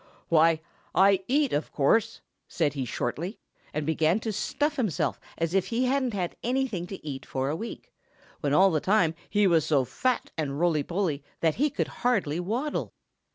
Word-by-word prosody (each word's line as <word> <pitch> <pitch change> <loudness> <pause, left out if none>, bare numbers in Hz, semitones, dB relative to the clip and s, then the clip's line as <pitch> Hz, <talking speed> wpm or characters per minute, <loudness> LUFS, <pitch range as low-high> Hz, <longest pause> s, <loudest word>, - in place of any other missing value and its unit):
"Why, 165 0 +4 0.3
I 195 +1 +5
eat, 280 +1 +2
of 150 - -1
course," 225 +11 +2 0.3
said 155 -4 0
he 135 -3 -3
shortly, 160 - -3 0.3
and 150 0 -2
began 160 +4 +2
to 220 -1 -2
stuff 290 +8 -1
himself 215 - 0 0.2
as 165 +1 -1
if 195 -2 +2
he 240 +2 0
hadn't 255 -3 +1
had 180 -3 -2
anything 240 -8 -1
to 190 -5 -8
eat 135 -2 -5
for 130 +1 -2
a - - -1
week, 235 - -7 0.5
when 145 - -1
all 190 +6 +6
the 155 - +2
time 185 -5 +3 0.2
he 205 -1 +3
was 165 -4 +4
so 140 -4 +2
fat 255 - -1
and 140 -2 -2
roly 165 -3 +2
poly 170 -3 -1 0.2
that 160 0 +2
he 300 - +4
could - - -2
hardly 190 -11 +1
waddle. 235 +12 -2
180 Hz, 180 wpm, -27 LUFS, 155-230 Hz, 0.5 s, all